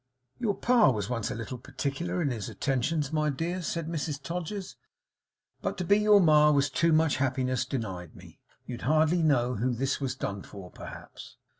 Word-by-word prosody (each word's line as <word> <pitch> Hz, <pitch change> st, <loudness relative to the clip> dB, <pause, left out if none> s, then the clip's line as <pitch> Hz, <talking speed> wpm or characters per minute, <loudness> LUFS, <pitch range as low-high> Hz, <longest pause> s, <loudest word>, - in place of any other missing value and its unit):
'Your 215 Hz, -5 st, 0 dB
pa 240 Hz, -6 st, +4 dB
was 105 Hz, -3 st, -2 dB
once 115 Hz, -3 st, -2 dB
a -, -, -4 dB
little 115 Hz, +2 st, -6 dB
particular 140 Hz, +7 st, -3 dB
in 140 Hz, -, 0 dB
his 110 Hz, -4 st, -4 dB
attentions, 145 Hz, +3 st, -1 dB
my 150 Hz, -1 st, +1 dB
dears,' 165 Hz, +5 st, -3 dB
said 165 Hz, -2 st, -3 dB
Mrs 155 Hz, -3 st, -3 dB
Todgers, 180 Hz, +6 st, -5 dB, 0.9 s
'but -, -, -2 dB
to 185 Hz, -, -2 dB
be 200 Hz, +3 st, +4 dB
your 210 Hz, -1 st, +6 dB
ma 150 Hz, -4 st, +6 dB
was 145 Hz, -1 st, +2 dB
too 170 Hz, 0 st, +2 dB
much 155 Hz, -1 st, +3 dB
happiness 130 Hz, -2 st, 0 dB
denied 95 Hz, -, -5 dB
me. -, -, -15 dB, 0.3 s
You'd 120 Hz, -2 st, -7 dB
hardly 155 Hz, +5 st, +3 dB
know 125 Hz, -6 st, +2 dB
who 120 Hz, +3 st, 0 dB
this 135 Hz, +4 st, -1 dB
was 130 Hz, -2 st, -2 dB
done 100 Hz, -6 st, -4 dB
for, 95 Hz, -3 st, -11 dB
perhaps? -, -, -11 dB
145 Hz, 180 wpm, -28 LUFS, 125-165 Hz, 0.9 s, your